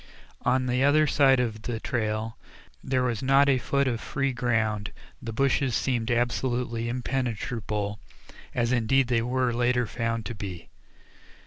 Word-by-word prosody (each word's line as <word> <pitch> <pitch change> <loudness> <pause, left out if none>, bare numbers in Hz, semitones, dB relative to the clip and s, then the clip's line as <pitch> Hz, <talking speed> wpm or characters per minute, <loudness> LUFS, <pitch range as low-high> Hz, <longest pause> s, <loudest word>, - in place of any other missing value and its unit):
On 130 +1 +2
the 125 +1 +1
other 150 +2 +5
side 135 -3 +4
of 110 -3 -2
the 115 0 -4
trail 110 -1 -2 0.5
there 130 -1 0
was 120 -4 -1
not 135 +2 +4
a 135 -2 +3
foot 140 +2 0
of 120 -3 -1
free 135 -1 -1
ground; 110 -4 0 0.3
the 115 - -5
bushes 135 +1 +1
seemed 120 -3 0
absolutely 120 -1 0
impenetrable, 115 -4 -2 0.6
as 120 0 +1
indeed 125 +2 +2
they 115 -2 +2
were 125 +1 0
later 125 +1 +2
found 115 0 -2
to - - -4
be. 95 -5 -7
120 Hz, 145 wpm, -27 LUFS, 115-130 Hz, 0.6 s, other